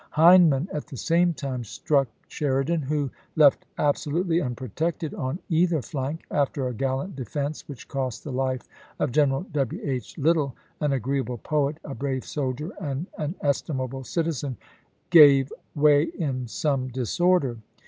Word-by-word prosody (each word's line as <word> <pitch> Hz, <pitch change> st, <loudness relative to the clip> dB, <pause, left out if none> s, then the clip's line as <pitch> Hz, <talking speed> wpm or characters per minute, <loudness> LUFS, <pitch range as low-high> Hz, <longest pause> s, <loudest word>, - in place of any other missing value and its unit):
Hindman 165 Hz, -2 st, +6 dB
at 150 Hz, -, -4 dB
the 140 Hz, -4 st, -8 dB
same 170 Hz, +6 st, +3 dB
time 130 Hz, -4 st, -4 dB
struck 135 Hz, +5 st, +1 dB, 0.2 s
Sheridan 145 Hz, +3 st, 0 dB
who, 145 Hz, -1 st, -1 dB, 0.2 s
left 145 Hz, -3 st, +5 dB
absolutely 165 Hz, +4 st, +1 dB
unprotected 145 Hz, -, -3 dB
on 145 Hz, -7 st, -3 dB
either 170 Hz, -1 st, +2 dB
flank 145 Hz, +1 st, -4 dB
— -, -, -25 dB
after 140 Hz, -2 st, 0 dB
a 125 Hz, -, -3 dB
gallant 135 Hz, -, -2 dB
defense 140 Hz, +3 st, -4 dB
which 140 Hz, -, -9 dB
cost 130 Hz, -5 st, -3 dB
the 145 Hz, -, -6 dB
life 130 Hz, 0 st, -2 dB, 0.3 s
of 145 Hz, -, 0 dB
General 135 Hz, 0 st, +2 dB
W. 135 Hz, -5 st, -1 dB
H. 130 Hz, -6 st, -4 dB
Lytle, 150 Hz, -3 st, +2 dB, 0.2 s
an 150 Hz, -2 st, +1 dB
agreeable 130 Hz, -1 st, -1 dB
poet, 150 Hz, +4 st, 0 dB
a 140 Hz, -, -6 dB
brave 135 Hz, -1 st, -3 dB
soldier, 145 Hz, +4 st, -3 dB
and 145 Hz, 0 st, -3 dB
an 155 Hz, +4 st, -2 dB
estimable 135 Hz, -2 st, -1 dB
citizen 145 Hz, -4 st, -2 dB, 0.3 s
— -, -, -42 dB
gave 140 Hz, -5 st, +7 dB, 0.2 s
way 145 Hz, -1 st, +5 dB, 0.2 s
in 130 Hz, -6 st, -2 dB
some 135 Hz, +1 st, -1 dB
disorder. 130 Hz, +1 st, +1 dB
140 Hz, 150 wpm, -25 LUFS, 130-155 Hz, 0.3 s, gave